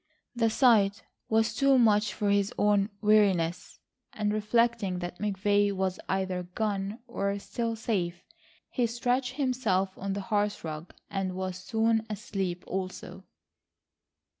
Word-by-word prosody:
The 230 -1 +2
sight 215 -4 +4 0.3
was 220 +1 +2
too 275 -1 +4
much 215 -3 +4
for 205 -2 0
his 200 0 +2
own 205 0 +3
weariness, 195 -6 +2 0.4
and 210 -1 -1
reflecting 215 -2 +1
that 175 0 -6
McVay 205 0 +2
was 190 -1 -1
either 190 -1 -1
gone 205 -1 -1
or 200 -4 -1
still 230 +3 -3
safe, 180 -6 -2 0.5
he 245 -3 +1
stretched 245 +2 -1
himself 245 -9 0
on 195 0 -2
the 200 - -3
hearth 210 -1 -1
rug 155 +1 -7 0.2
and 190 -1 -2
was 185 -1 -3
soon 225 +3 +1
asleep 190 -3 -3
also. 185 0 -5
205 Hz, 130 wpm, -29 LUFS, 190-225 Hz, 0.5 s, sight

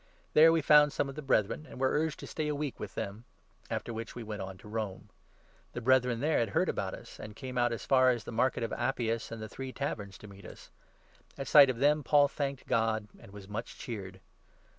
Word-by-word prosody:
There 160 +1 +8
we 165 -2 +2
found 150 0 +6
some 140 - -1
of - - -6
the 150 - -5
Brethren, 110 -7 +1
14 155 - -14
and - - -10
were 130 0 +2
urged 155 +1 0
to - - -7
stay 155 -1 -3
a 150 - -1
week 145 -4 -4
with - - -7
them; 100 +4 -5 0.5
after 120 - -3
which 115 0 -6
we 120 - -6
went 105 -2 -6
on 95 0 -7
to 105 - -15
Rome. 105 -3 -5 0.6
The 120 - -5
Brethren 125 -1 +3
there 155 +1 +2
had 115 - 0
heard - - +2
about - - -2
us, - - -13
15 - - -10
and 105 -1 -9
came 130 +1 -7
out 120 -1 +2
as 115 -3 -5
far 130 -1 +5
as 120 -3 0
the - - -7
Market 120 +1 +1
of 115 - -3
Appius 120 -2 -1
and 115 - -6
the - - -5
Three 130 +3 -7
Taverns 105 -8 -4
to 105 - -12
meet.us. 100 -2 -13 0.7
At 135 - -5
sight 145 -3 +8
of 125 - -1
them 150 +4 +3
Paul 145 +2 +5
thanked 140 -1 -4
God 110 -3 0
and - - -14
was 100 -1 -11
much 110 +3 -6
cheered. 95 -5 -7
120 Hz, 240 wpm, -31 LUFS, 110-140 Hz, 0.7 s, There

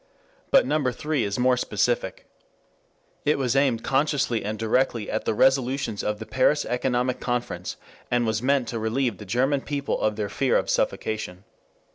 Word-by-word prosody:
But - - +5
number 140 -1 +1
three 150 0 -1
is 100 0 -2
more 125 0 +3
specific. 105 -3 -1 1.0
It 150 - +2
was 130 -2 0
aimed 135 -5 +2
consciously 135 -4 +1
and 105 +2 -3
directly 115 0 0
at 110 - -2
the - - 0
resolutions 130 -3 +2
of 105 0 -1
the 110 - -7
Paris 130 +5 +2
Economic 125 0 0
Conference, 120 -8 -3 0.3
and 120 -1 +1
was 110 0 0
meant 135 -1 +2
to 115 - -3
relieve 115 -1 -1
the 105 - -8
German 130 +7 +1
people 140 -1 -2
of 110 -1 +1
their 105 -1 -2
fear 130 +6 +1
of - - -1
suffocation. 100 -4 -2
125 Hz, 165 wpm, -25 LUFS, 110-135 Hz, 1.0 s, But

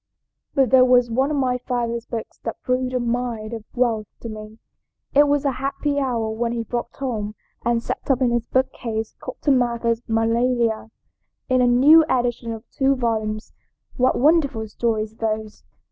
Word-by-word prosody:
"But 265 -4 +3
there 260 -1 +7
was 250 -2 +4
one 265 +4 +1
of 300 - -1
my 250 -2 +1
father's 235 -2 -2
books 230 -2 -6
that 225 - -5
proved 255 0 0
a - - +2
mine 235 -2 -2
of 225 -2 -6
wealth 230 -4 +1
to 230 - -6
me. 215 0 -9 0.6
It 290 +1 +6
was 290 0 +1
a 275 - +3
happy 285 +1 -1
hour 235 -5 -1
when 230 +1 -2
he 235 -1 -2
brought 240 +1 -4
home 215 -6 -3 0.3
and 235 -1 +1
set - - -5
up 265 -2 +3
in 250 -2 +2
his 235 -1 -1
bookcase 230 -4 -2
Cotton 275 -4 0
Mather's 235 -1 0
'Magnalia,' 230 0 +1 0.6
in 255 -1 +3
a 250 - +4
new 285 +7 +7
edition 240 -2 0
of 225 +1 -8
two 275 -1 +2
volumes. 220 -3 -2 0.4
What 255 0 +2
wonderful 280 -6 +2
stories 220 0 -2
those! 215 -1 -3
240 Hz, 170 wpm, -22 LUFS, 225-255 Hz, 0.6 s, there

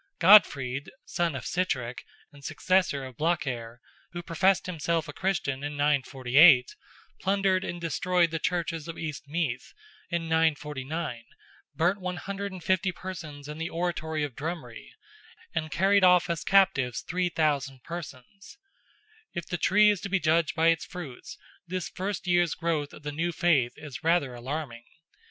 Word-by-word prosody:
Godfrid, 145 -8 +5 0.2
son 170 -4 -1
of 130 - -6
Sitrick, 130 -10 -2 0.3
and 140 -1 -16
successor 155 -2 +1
of 130 -3 -11
Blacair, 130 -8 -2 0.3
who 175 0 -5
professed 185 +3 +2
himself 165 -2 -1
a 145 - -7
Christian 145 -7 -2
in 145 0 -3
948, 135 -1 +4 0.4
plundered 195 -1 +1
and 175 - -5
destroyed 170 +1 +1
the 165 - -2
churches 165 -2 -2
of 165 - -7
East 150 -2 -6
Meath 145 -5 -3 0.3
in 170 -1 -1
949, 150 -5 -1 0.5
burnt 180 +4 +1
150 185 0 -2
persons 155 -7 -8
in 150 +1 -7
the 165 +1 -3
oratory 160 -2 -2
of 140 -5 -4
Drumree, 150 -6 -6 0.6
and 155 0 -2
carried 195 +4 +3
off 180 -1 +5
as 170 - -3
captives 140 -11 +3
3,000 150 -7 -1
persons. 170 - -9 0.8
If 170 - -3
the 175 - -3
tree 210 +7 +5
is 205 - -3
to 200 - -5
be 195 0 +1
judged 160 -1 +2
by 165 +1 +4
its 165 -2 +1
fruits, 155 -9 -9 0.3
this 185 0 -3
first 190 +1 -4
year's 175 -2 +2
growth 160 -4 -1
of - - -13
the 145 - -4
new 165 +4 -1
faith 155 -8 +2
is 150 -4 -9
rather 165 -6 +2
alarming. 120 -1 -6
165 Hz, 145 wpm, -27 LUFS, 145-180 Hz, 0.8 s, Godfrid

